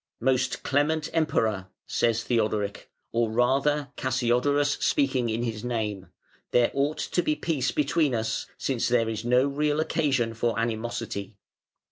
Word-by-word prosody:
"Most 130 +1 0
clement 150 +2 +1
Emperor", 110 - +1 0.2
says 115 -1 +1
Theodoric, 105 -4 -1 0.2
or 115 -1 +1
rather 135 +5 +1
Cassiodorus 130 +3 +1
speaking 130 -4 +1
in 115 +2 -1
his 110 -3 -3
name, 105 -6 -3 0.4
"there 120 -1 +3
ought 140 +3 0
to 175 - 0
be 155 - 0
peace 150 -4 -1
between 150 -2 +1
us 110 0 -2
since 130 -4 -1
there 120 -2 +2
is 110 0 -4
no 125 +2 +3
real 145 +1 0
occasion 135 -7 +1
for 115 +1 -1
animosity. 110 -3 -3
125 Hz, 135 wpm, -26 LUFS, 115-145 Hz, 0.4 s, there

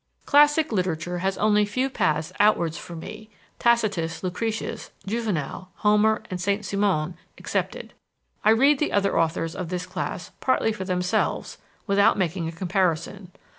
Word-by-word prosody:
Classic 295 +1 +4
literature 180 -3 -1
has 190 +1 -1
only 210 0 +3
few 255 +6 0
paths 155 - -1
outwards 175 -6 +3
for 170 0 -8
me 215 +6 -9 0.3
Tacitus, 205 -9 +1
Lucretius, 220 +5 -3 0.2
Juvenal, 195 -5 -3
Homer, 215 +1 +3
and 180 -1 -3
Saint 200 +3 0
Simon 185 -5 0 0.2
excepted. - - -3 0.5
I - - +5
read 270 +6 +5
the 300 - 0
other 200 -3 +2
authors 165 0 0
of 180 -3 -5
this 180 0 -3
class 180 -1 -5
partly 255 -3 +2
for 190 -3 -5
themselves, 180 -1 -1 0.3
without 200 +2 +4
making 175 -2 -1
a - - -3
comparison. 180 +1 -1
195 Hz, 140 wpm, -25 LUFS, 175-215 Hz, 0.5 s, I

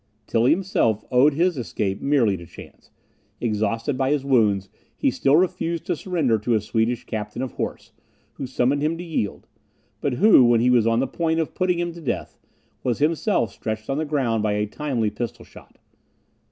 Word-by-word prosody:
Tilly 115 +3 +2
himself 160 - +1
owed 135 +4 +4
his 170 -2 +1
escape 100 -4 -3
merely 130 -8 +2
to 85 -2 -10
chance. - - -14 0.5
Exhausted 115 +4 -1
by 135 0 +1
his 145 -2 0
wounds, 105 -8 +2 0.3
he 275 - +2
still 145 - +2
refused 170 -1 0
to - - 0
surrender 155 - 0
to 115 +2 0
a - - +3
Swedish 115 +3 -1
captain 105 +3 -5
of 130 - -4
horse, - - -5 0.4
who 135 - -6
summoned 130 +2 +1
him 155 +2 0
to 175 - -6
yield; 160 - -3 0.5
but 140 - -1
who, 195 - +6
when 120 -1 +4
he 125 +2 +3
was 120 -3 +4
on 115 +1 +2
the - - +1
point 160 +4 -1
of 160 - -2
putting 180 -1 0
him 175 0 -2
to 170 - -11
death, 140 - -3 0.5
was 120 -3 -1
himself 155 - +1
stretched 110 +2 -4
on 135 - -1
the - - 0
ground 130 -7 0
by 105 -1 0
a 105 0 0
timely 115 -2 -2
pistol 115 +2 -6
shot. - - -17
125 Hz, 190 wpm, -23 LUFS, 110-155 Hz, 0.5 s, who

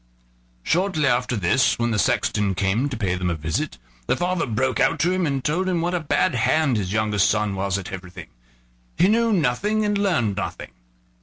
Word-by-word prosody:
Shortly 180 - +1
after 125 -1 +1
this, 115 +5 +2
when 120 0 0
the 110 - 0
sexton 100 +1 +1
came 100 +9 0
to 130 - -5
pay 100 -5 -1
them 90 -1 -2
a 85 - -1
visit, 80 -5 -3 0.3
the - - +1
father 175 -2 -1
broke 125 +1 -1
out - - +2
to 175 - +2
him, 185 -2 0
and 135 -2 -2
told 180 +5 0
him 175 -2 0
what 175 +2 -1
a 180 - +1
bad 155 -4 +1
hand 130 +3 +2
his 95 -4 -2
youngest 105 -2 +2
son 105 -1 0
was 95 0 -1
at 95 - -7
everything: 90 -2 -9 0.7
he 180 - +4
knew 230 +2 +2
nothing 205 - +1
and 205 0 0
learned 130 - 0
nothing. - - -5
125 Hz, 200 wpm, -22 LUFS, -, 0.7 s, he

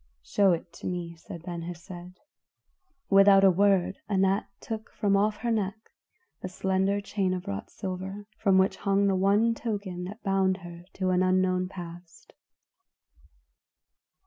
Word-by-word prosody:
"Show 200 -2 +3
it 170 +1 -5
to - - -7
me," 175 -2 -4
said 165 0 -10
Ben 175 -1 -5
Hesed. 175 +1 -9 0.9
Without 195 0 +7
a 195 - +7
word 195 0 +2
Anat 195 0 +2
took 220 0 -6
from 200 -1 +1
off 210 +1 +2
her 235 +2 -2
neck 215 0 -2 0.5
the 185 - -5
slender 190 +2 0
chain 195 -2 -1
of 180 - -7
wrought 100 0 -5
silver, 190 +2 -6
from 195 -2 +3
which 190 0 +3
hung 200 0 +1
the 195 -1 +2
one 200 +5 +3
token 200 -6 -4
that 205 +5 -9
bound 195 -1 +2
her 175 0 -10
to 185 -1 -1
an 180 0 +2
unknown 185 0 +2
past. 175 -2 -11
190 Hz, 145 wpm, -28 LUFS, 180-200 Hz, 0.9 s, Without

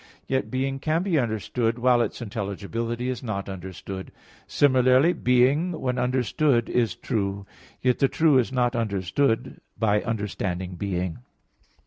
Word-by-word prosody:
Yet 130 0 -1
being 135 +1 -2
can 160 +4 0
be 180 -6 +2
understood 115 0 -1
while 125 0 +4
its 120 - -2
intelligibility 115 +3 -3
is 130 -2 -3
not 105 -5 -4
understood. 95 0 -7 0.4
Similarly, 130 +3 +4
being 140 +8 +2
when 125 -1 -1
understood 125 +1 +1
is 120 -2 +1
true, 100 -2 -2 0.4
yet 125 -2 +2
the 135 - +4
true 150 -2 +4
is 125 - 0
not 125 -1 +1
understood 115 +4 0 0.2
by 105 -2 +2
understanding 95 -5 -3
being. 90 -3 -3
120 Hz, 130 wpm, -25 LUFS, 100-130 Hz, 0.4 s, while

